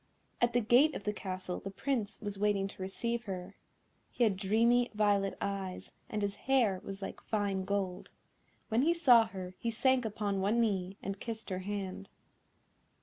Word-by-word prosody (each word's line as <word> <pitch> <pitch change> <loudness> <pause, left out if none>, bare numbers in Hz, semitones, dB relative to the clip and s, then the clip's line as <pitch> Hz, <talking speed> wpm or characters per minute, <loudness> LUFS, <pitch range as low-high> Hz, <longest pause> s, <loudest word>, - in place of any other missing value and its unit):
At 240 0 +3
the 245 - +3
gate 250 +8 +5
of - - -5
the 210 - -1
Castle 185 -3 -4
the 195 - -6
Prince 220 +1 -2
was 205 -2 -4
waiting 205 -1 +2
to 195 - -11
receive 235 +5 -2
her. 190 0 -6 0.5
He 245 - 0
had 215 -4 +3
dreamy 230 +5 +3
violet 200 -2 +2
eyes, 195 -2 -4 0.2
and 210 -1 -2
his 200 0 -2
hair 230 -9 +3
was 195 0 -7
like - - -6
fine 200 -3 -1
gold. 195 -2 -2 0.6
When 225 +2 +3
he 335 +5 +3
saw 245 -9 +7
her 185 -1 -7
he 235 - -1
sank 255 +3 +2
upon 205 -3 -1
one 210 +5 +2
knee, 195 -4 0
and 195 +1 -4
kissed 225 -3 -6
her 185 - -1
hand. 190 - -5
205 Hz, 175 wpm, -32 LUFS, 195-235 Hz, 0.6 s, saw